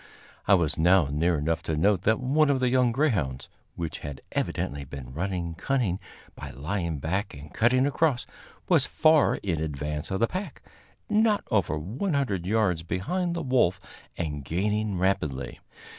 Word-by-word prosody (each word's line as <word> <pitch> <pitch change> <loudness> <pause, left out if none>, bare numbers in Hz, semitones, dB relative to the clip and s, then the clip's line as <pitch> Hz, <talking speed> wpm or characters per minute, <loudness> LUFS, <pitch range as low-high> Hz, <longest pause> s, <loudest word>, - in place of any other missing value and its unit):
I 100 - +7
was 80 -4 +1
now 90 -2 +4
near 80 +3 +1
enough 80 +3 -1
to 80 - -2
note 95 +3 +3
that 110 - +3
one 140 +4 +2
of 135 -2 +2
the 130 -1 +2
young 125 -1 +3
greyhounds, 95 - 0 0.3
which 85 -2 -4
had 75 -2 -7
evidently 70 0 -2
been 65 -2 -9
running 85 +1 -3
cunning 100 0 -1 0.3
by 70 - -8
lying 80 +5 -3
back 90 +7 -2
and 70 +1 -11
cutting 125 +3 +3
across, 145 -2 +1 0.4
was - - +4
far 155 -2 +4
in 85 -6 -2
advance 75 0 -3
of 95 - -2
the 115 - +3
pack 185 - -6 0.4
not 215 0 +2
over 95 -7 +1
100 110 - -2
yards 100 -6 +1
behind 170 - -2
the 170 - -3
wolf, 120 -9 +2 0.4
and 75 -4 -3
gaining 105 +6 -1
rapidly. 75 -8 -1
95 Hz, 160 wpm, -27 LUFS, 80-125 Hz, 0.4 s, I